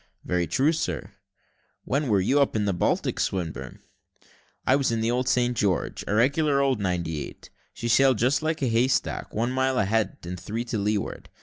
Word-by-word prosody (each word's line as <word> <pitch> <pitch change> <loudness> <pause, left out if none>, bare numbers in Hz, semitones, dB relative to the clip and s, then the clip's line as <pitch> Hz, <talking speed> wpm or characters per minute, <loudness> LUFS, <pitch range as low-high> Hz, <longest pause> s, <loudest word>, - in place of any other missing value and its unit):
"Very 90 -1 0
true, 135 - +2
sir." 90 - -3 0.7
"When 140 +2 0
were 105 -4 +3
you 130 +10 +2
up 140 - +2
the 105 -2 0
Baltic, 90 - 0
Swinburne?" 80 -9 -3 0.8
"I 130 - +4
was 135 -3 +1
in 115 - 0
the 115 +1 +1
old 125 +1 0
St. 125 0 +2
George, 100 -5 -1
a 105 - 0
regular 140 +5 +3
old 135 -4 +2
ninety 85 -6 -2
eight; - - -12 0.2
she 120 - -5
sailed 130 +1 +4
just 130 +7 +2
like 155 -1 -1
a - - +2
hay 115 +2 +3
stack, 130 - -1
one 115 +3 -1
mile 130 0 +1
ahead 110 0 +1
and 90 +1 -6
three 115 +6 -4
to 115 -3 -2
leeward. 105 0 -2
115 Hz, 190 wpm, -26 LUFS, 95-130 Hz, 0.8 s, I